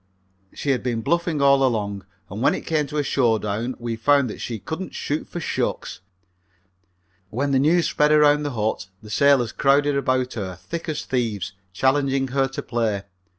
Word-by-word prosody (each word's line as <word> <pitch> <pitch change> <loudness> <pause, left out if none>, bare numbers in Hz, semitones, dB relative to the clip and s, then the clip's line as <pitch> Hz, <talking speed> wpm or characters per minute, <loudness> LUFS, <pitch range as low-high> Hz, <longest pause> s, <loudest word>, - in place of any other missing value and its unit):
She 140 - -2
had 130 - 0
been 120 -3 -2
bluffing 170 -2 0
all 140 -1 +5
along, 100 -6 -1 0.2
and 100 +4 -7
when 145 +4 +3
it - - -7
came 155 -3 0
to 150 - -5
a 145 - +2
showdown 115 -2 0
we 120 -1 -4
found 135 +1 +3
that - - -9
she 115 - -4
couldn't 160 - -6
shoot 150 +2 -3
for 175 - -6
shucks. - - -3 1.3
When 140 +7 -1
the 135 - +3
news 165 +5 +3
spread 150 0 +2
around 150 -1 +5
the 145 -2 -3
hut 110 -3 -2 0.2
the 105 - -10
sailors 135 -2 +4
crowded 140 +1 +2
about 130 -2 0
her 95 -5 -5
thick 165 - -6
as 155 - -3
thieves, 110 -6 -2 0.2
challenging 135 +5 +1
her 135 +1 +1
to 135 - -6
play. 110 -4 -1
135 Hz, 180 wpm, -23 LUFS, 115-145 Hz, 1.3 s, all